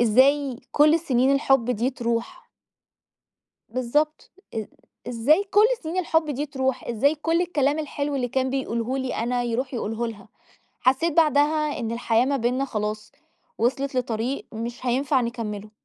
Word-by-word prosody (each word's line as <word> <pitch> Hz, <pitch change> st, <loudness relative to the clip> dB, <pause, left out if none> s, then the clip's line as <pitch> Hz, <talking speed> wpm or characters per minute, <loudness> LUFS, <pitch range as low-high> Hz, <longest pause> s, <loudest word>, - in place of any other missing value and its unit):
إزاي 260 Hz, +3 st, +3 dB
كُل 300 Hz, +1 st, +5 dB
السّنين 270 Hz, -5 st, +2 dB
الحب 270 Hz, -3 st, +2 dB
دِي 245 Hz, +2 st, 0 dB
تَروح؟ 235 Hz, -2 st, -3 dB, 1.2 s
بالضبط، 295 Hz, +5 st, -1 dB, 0.2 s
إ 220 Hz, -2 st, -3 dB, 0.4 s
إزاي 260 Hz, -, +3 dB
كُل 415 Hz, +2 st, +6 dB, 0.2 s
سِنين 330 Hz, +3 st, -3 dB
الحُب 320 Hz, -3 st, +1 dB
دِي 290 Hz, +2 st, -2 dB
تروح؟ 265 Hz, -2 st, -2 dB
إزاي 255 Hz, +6 st, +2 dB
كُل 325 Hz, +2 st, 0 dB
الكَلام 295 Hz, -4 st, +1 dB
الحلو 290 Hz, -1 st, -3 dB
اللي 250 Hz, -2 st, -1 dB
كان 260 Hz, +1 st, 0 dB
بيقوله 255 Hz, -1 st, -2 dB
لي 260 Hz, -1 st, -2 dB
أنا 245 Hz, +2 st, -1 dB
يروح 245 Hz, +3 st, -2 dB
يقوله 225 Hz, +1 st, -2 dB
لها؟! 210 Hz, -2 st, -9 dB, 0.5 s
حَسّيت 270 Hz, +6 st, +2 dB
بعدها 300 Hz, -1 st, +2 dB
إن 230 Hz, -1 st, -3 dB
الحياة 235 Hz, 0 st, +2 dB
ما 280 Hz, +1 st, +1 dB
بيننا 250 Hz, +2 st, 0 dB
خلاص، 215 Hz, -4 st, -4 dB, 0.5 s
وصلت 270 Hz, +3 st, 0 dB
لطريق 245 Hz, +1 st, -2 dB
مش 235 Hz, +3 st, -6 dB
هينفع 260 Hz, +2 st, +2 dB
نكمله، 220 Hz, -3 st, -4 dB
260 Hz, 145 wpm, -24 LUFS, 235-290 Hz, 1.2 s, كُل